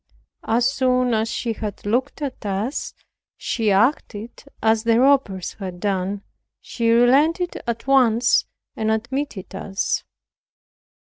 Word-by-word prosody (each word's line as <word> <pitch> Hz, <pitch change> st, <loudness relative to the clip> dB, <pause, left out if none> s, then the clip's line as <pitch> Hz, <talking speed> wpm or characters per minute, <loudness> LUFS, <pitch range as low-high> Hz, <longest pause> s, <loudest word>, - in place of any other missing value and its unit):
As 240 Hz, +3 st, +2 dB
soon 255 Hz, -2 st, +1 dB
as 220 Hz, 0 st, 0 dB
she 230 Hz, 0 st, -2 dB
had 210 Hz, -2 st, -6 dB
looked 255 Hz, +7 st, -1 dB
at 270 Hz, -3 st, -5 dB
us, 205 Hz, +7 st, -3 dB, 0.4 s
she 225 Hz, -3 st, -1 dB
acted 220 Hz, +1 st, 0 dB, 0.2 s
as 220 Hz, 0 st, +2 dB
the 230 Hz, 0 st, +3 dB
robbers 255 Hz, -9 st, +2 dB
had 185 Hz, -3 st, -6 dB
done; 195 Hz, +1 st, -2 dB, 0.4 s
she 230 Hz, -1 st, -2 dB
relented 285 Hz, +10 st, +3 dB
at 235 Hz, -1 st, -3 dB
once 245 Hz, -3 st, +4 dB, 0.3 s
and 220 Hz, 0 st, -1 dB
admitted 235 Hz, -2 st, -3 dB
us. 195 Hz, 0 st, -2 dB
230 Hz, 120 wpm, -22 LUFS, 210-255 Hz, 0.4 s, once